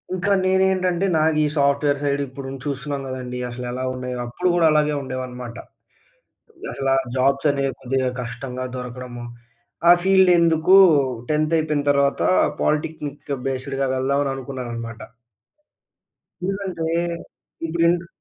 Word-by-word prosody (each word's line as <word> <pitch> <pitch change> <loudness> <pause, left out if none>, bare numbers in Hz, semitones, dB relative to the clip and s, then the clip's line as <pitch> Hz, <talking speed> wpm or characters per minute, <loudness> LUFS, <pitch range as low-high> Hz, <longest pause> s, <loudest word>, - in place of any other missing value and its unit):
ఇంకా 185 +2 -1
నేనేంటంటే 190 -1 +2
నాకీ 155 0 +2
సాఫ్ట్ 140 0 +2
వేర్ 145 -1 +2
సైడ్ 140 0 0
ఇప్పుడుం 135 +1 -8
చూస్తున్నాం 140 0 -3
గదండీ. 125 -1 -5
అసలు 125 +1 -6
ఎలా 130 +1 -4
ఉన్నాయో. 125 0 -5
అప్పుడు 120 +10 -2
గూడా 170 -2 +3
అలాగే 150 0 +2
ఉండేవనమాట. 125 -2 -6 1.2
అసలా 135 -1 0 0.2
జాబ్స్ 135 +3 +2
అనేవి 140 -1 -1
కొద్దిగా 130 0 0
కష్టంగా 125 +2 -6
దొరకడము. 125 -1 -7 0.7
ఆ - - +11
ఫీల్డ్ 190 -1 +5
ఎందుకు 165 +1 +3 0.6
10త్ 155 +1 +1
అయిపోయిన 155 -2 0
తరువాత 140 0 +1 0.4
పాలిటెక్నిక్ 150 -1 -2 0.2
బేస్డ్‌గా 135 +1 -2
వెళ్దాం 135 +2 +1
అని 135 - -1
అనుకున్నాననమాట. 120 -4 -6 1.4
ఎందుకంటే 190 -3 -3 0.8
ఇప్పుడు 165 +1 0
ఇన్‌ట్ర్ 170 0 0
140 Hz, 120 wpm, -22 LUFS, 130-160 Hz, 1.4 s, ఆ